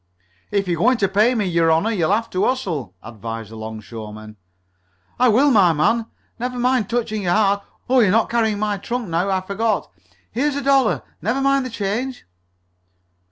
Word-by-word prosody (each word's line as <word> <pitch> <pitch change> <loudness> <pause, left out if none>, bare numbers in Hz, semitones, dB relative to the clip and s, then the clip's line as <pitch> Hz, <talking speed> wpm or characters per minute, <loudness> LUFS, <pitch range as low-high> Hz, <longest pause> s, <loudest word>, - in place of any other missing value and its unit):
"If 200 -2 0
you're 170 -2 -1
goin' 250 +2 +4
t' 200 - +2
pay 210 +6 +3
me, 215 -3 0
your 170 -2 +2
honor, 165 +8 +2
you'll 180 -6 +1
have 225 +3 +1
t' 185 - -2
hustle," 165 - -1
advised 115 -1 -7
the - - -9
'longshoreman. 110 -1 -8 0.8
"I 250 - +5
will, 260 +6 +4
my 190 -8 +5
man. 220 +10 +1 0.3
Never 250 +1 -3
mind 245 -4 +1
touching 220 -3 -1
your 175 -2 +1
hat. 200 -1 +2 0.2
Oh, 260 +1 +4
you 225 - +5
are - - +2
not 225 +4 +3
carrying 220 -3 +1
my 210 -1 -1
trunk 235 +1 -4
now; 170 +4 0
I 190 -1 +1
forgot. 210 +4 -1 0.4
Here's 280 +4 0
a 285 - -3
dollar. 270 -4 +3 0.2
Never 240 +5 0
mind 275 -1 +2
the - - -7
change." 230 +4 -3
210 Hz, 185 wpm, -21 LUFS, 170-245 Hz, 0.8 s, I